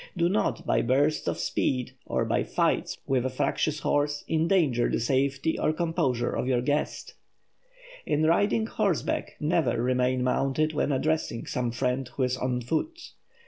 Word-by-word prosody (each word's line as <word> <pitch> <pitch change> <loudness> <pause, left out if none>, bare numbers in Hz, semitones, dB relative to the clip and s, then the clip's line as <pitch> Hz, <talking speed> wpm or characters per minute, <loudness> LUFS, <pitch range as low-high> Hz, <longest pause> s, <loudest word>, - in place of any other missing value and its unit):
Do 170 0 +3
not, 205 +3 0
by - - +2
bursts 140 +5 +1
of - - 0
speed, 125 -2 -1 0.2
or - - 0
by - - +1
"fights" - - 0
with 130 -2 +1
a 130 - 0
fractious 145 +3 -1
horse, 145 +1 0
endanger 160 -7 +2
the - - 0
safety 135 +5 0
or - - +2
composure 135 -7 0
of - - -2
your 125 -2 +2
guest. 145 +3 -2 0.9
In 150 +1 +1
riding 200 +7 +3
horseback, 205 -7 -1
never 150 -7 +1
remain 125 +1 +1
mounted 135 +4 +1
when 150 - 0
addressing 145 -3 -1
some 120 -1 -2
friend 125 +1 -1
who 135 - 0
is 125 0 +1
on 125 -1 -1
foot. 315 - -3
140 Hz, 155 wpm, -27 LUFS, 125-160 Hz, 0.9 s, Do